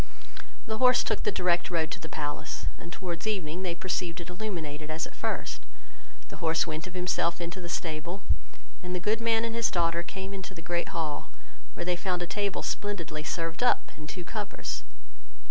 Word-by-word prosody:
The 220 -2 -1
horse 250 -1 +7
took - - +1
the 210 - +3
direct 175 -2 +3
road 165 -3 +2
to - - -2
the 160 -2 -6
palace; 145 -1 -2
and 170 - -8
towards 175 +1 -3
evening 180 -5 0
they 180 -2 0
perceived 180 -1 0
it 170 +1 -5
illuminated 160 -7 -3
as 155 +1 0
at - - -10
first: - - -1 0.7
the - - -7
horse 160 0 +3
went 160 +1 -3
of 185 - -9
himself 180 -1 +2
into 175 +2 -3
the 175 - -5
stable, 170 +3 -2 0.6
and 180 -1 -2
the - - +1
good 215 +5 +2
man 230 0 +4
and 230 - -1
his 230 -1 +4
daughter 170 -1 +3
came 190 +2 -5
into 190 -1 -5
the 165 - -8
great 175 0 +1
hall, 160 -5 -1 0.5
where - - -2
they 180 0 +3
found 180 0 0
a - - 0
table 200 +2 0
splendidly 175 -7 -1
served 165 +3 -1
up, 245 - +4
and 155 0 -8
two 180 - -4
covers. 205 +2 -3
175 Hz, 195 wpm, -30 LUFS, 165-195 Hz, 0.7 s, horse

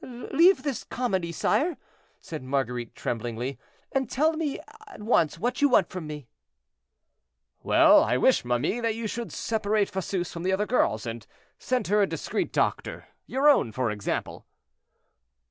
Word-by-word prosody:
"Leave 295 +9 +2
this 280 -6 -3
comedy, 190 -9 -2
sire," 305 - 0 0.4
said 155 -2 -7
Marguerite, 125 -3 -3
tremblingly, 120 +3 -4 0.3
"and 265 -3 -1
tell 310 +4 +2
me 310 -3 -2 0.3
at 405 - -12
once 165 - +2
what 245 +8 -2
you 285 - +5
want - - +4
from 180 -5 -6
me." 150 -4 -8 1.3
"Well, - - +6
I - - +1
wish, - - +3
ma 120 0 +1
mie, 155 - -1
that 230 -2 -1
you 230 0 -5
should 230 +2 -4
separate 215 -2 0
Fosseuse 185 -1 -3
from 170 - -6
the 185 +2 0
other 205 +2 +1
girls, 120 - +1
and 115 -2 -6 0.3
send 255 -1 -1
her 210 +1 +4
a 200 - +3
discreet - - -3
doctor; - - -2 0.2
your 270 +3 +1
own, 280 - +4
for 125 0 -1
example." 105 -1 -4
195 Hz, 160 wpm, -26 LUFS, -, 1.3 s, Well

